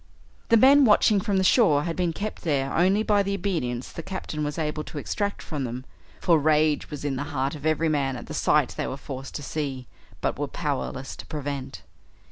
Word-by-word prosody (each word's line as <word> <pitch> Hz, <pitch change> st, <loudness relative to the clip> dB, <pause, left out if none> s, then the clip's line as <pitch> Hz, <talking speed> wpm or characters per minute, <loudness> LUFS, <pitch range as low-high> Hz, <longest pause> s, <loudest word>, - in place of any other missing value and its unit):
The 230 Hz, -, +6 dB
men 275 Hz, +5 st, +7 dB
watching 210 Hz, -3 st, +5 dB
from 205 Hz, -2 st, 0 dB
the 190 Hz, -, +2 dB
shore 185 Hz, -, +4 dB
had 165 Hz, 0 st, -3 dB
been 180 Hz, -2 st, 0 dB
kept 210 Hz, +6 st, -5 dB
there 140 Hz, -4 st, 0 dB
only 190 Hz, +5 st, +3 dB
by 210 Hz, -2 st, +3 dB
the 200 Hz, 0 st, -1 dB
obedience 130 Hz, -12 st, -2 dB
the -, -, -6 dB
Captain 165 Hz, -4 st, -5 dB
was 150 Hz, 0 st, -3 dB
able 155 Hz, -1 st, -2 dB
to -, -, -8 dB
extract 200 Hz, +7 st, -2 dB
from 150 Hz, -4 st, -4 dB
them, 125 Hz, +1 st, -5 dB, 0.3 s
for 165 Hz, -3 st, +4 dB
rage 155 Hz, 0 st, +2 dB
was 145 Hz, -1 st, -6 dB
in 135 Hz, -2 st, -1 dB
the 145 Hz, -, -3 dB
heart 140 Hz, -2 st, -2 dB
of 155 Hz, 0 st, -4 dB
every 155 Hz, +1 st, +1 dB
man 140 Hz, -4 st, 0 dB
at 120 Hz, -, -7 dB
the -, -, -8 dB
sight -, -, +3 dB
they -, -, -1 dB
were 135 Hz, -, -4 dB
forced 135 Hz, -1 st, -8 dB
to 145 Hz, -, -4 dB
see, 135 Hz, -4 st, -4 dB, 0.3 s
but -, -, -2 dB
were 145 Hz, -, -1 dB
powerless 135 Hz, -3 st, -3 dB
to -, -, -9 dB
prevent. 140 Hz, -, -5 dB
150 Hz, 215 wpm, -25 LUFS, 140-185 Hz, 0.3 s, men